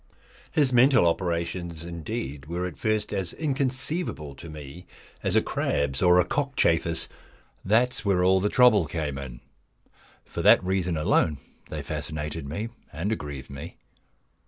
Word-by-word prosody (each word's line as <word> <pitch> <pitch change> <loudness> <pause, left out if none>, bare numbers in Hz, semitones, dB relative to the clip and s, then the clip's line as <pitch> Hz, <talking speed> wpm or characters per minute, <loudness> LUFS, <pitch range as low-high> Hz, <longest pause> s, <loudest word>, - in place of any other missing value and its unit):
His 140 -5 +2
mental 125 -3 +6
operations, 85 -1 -1
indeed, 75 -4 -5
were 90 +2 -2
at 90 -4 -5
first 110 +6 -1
as 95 -4 -2
inconceivable 135 - -2
to 80 +5 -11
me 75 +3 -10 0.3
as - - +1
a - - +4
crab's 70 -2 -1
or 90 0 +6
a 90 - +4
cockchafer's. 85 - +1 0.6
That 115 +6 +3
is - - 0
where 95 -4 +2
all 95 +1 +5
the 105 +2 +1
trouble 110 -9 +5
came 75 -4 -3
in. 60 -3 -8 0.8
For - - -5
that - - +6
reason 90 -2 0
alone 75 0 +2 0.3
they - - -5
fascinated 75 -1 -4
me 105 +10 -4 0.2
and 85 +8 -2
aggrieved 70 -10 -5
me. 70 +1 -8
85 Hz, 145 wpm, -26 LUFS, 75-105 Hz, 0.8 s, mental